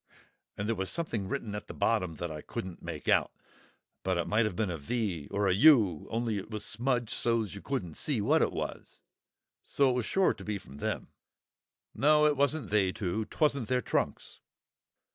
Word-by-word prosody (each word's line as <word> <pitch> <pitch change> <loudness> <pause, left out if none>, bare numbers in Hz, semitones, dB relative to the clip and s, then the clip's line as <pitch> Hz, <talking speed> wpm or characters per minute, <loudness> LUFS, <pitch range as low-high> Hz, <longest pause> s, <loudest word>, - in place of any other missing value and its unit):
And 105 - -2
there 115 - +2
was 95 -1 -2
something 115 - -1
written 105 +2 -3
at 105 - -6
the - - -8
bottom 90 -3 +1
that 85 +2 -4
I 75 -1 -6
couldn't 90 +2 -6
make 85 -3 -7
out, - - +3 0.7
but 95 -2 0
it 85 - 0
might 110 +2 +2
have 105 - -2
been 100 -1 0
a 85 - -3
'V,' 90 -3 -2
or 100 0 0
a 95 - +4
'U,' 105 - +5
only 115 -2 -1
it 95 - -9
was 105 -2 -3
smudged 120 0 0
so's 115 -3 0
you 100 - -8
couldn't 100 - -3
see 145 - 0
what 105 - +3
it - - +2
was. - - -6 0.6
So 140 -2 +2
it - - -1
was 125 -2 -1
sure 190 -1 +3
to - - -11
be 105 -1 -2
from 70 -7 -13
them." - - -3 0.8
"No, 150 +1 +4
it 150 -1 +4
wasn't 140 +2 0
they 100 -3 +3
two; 105 +3 -2
'twasn't 140 -1 0
their 125 -1 +1
trunks." - - -2
105 Hz, 200 wpm, -30 LUFS, 95-125 Hz, 0.8 s, U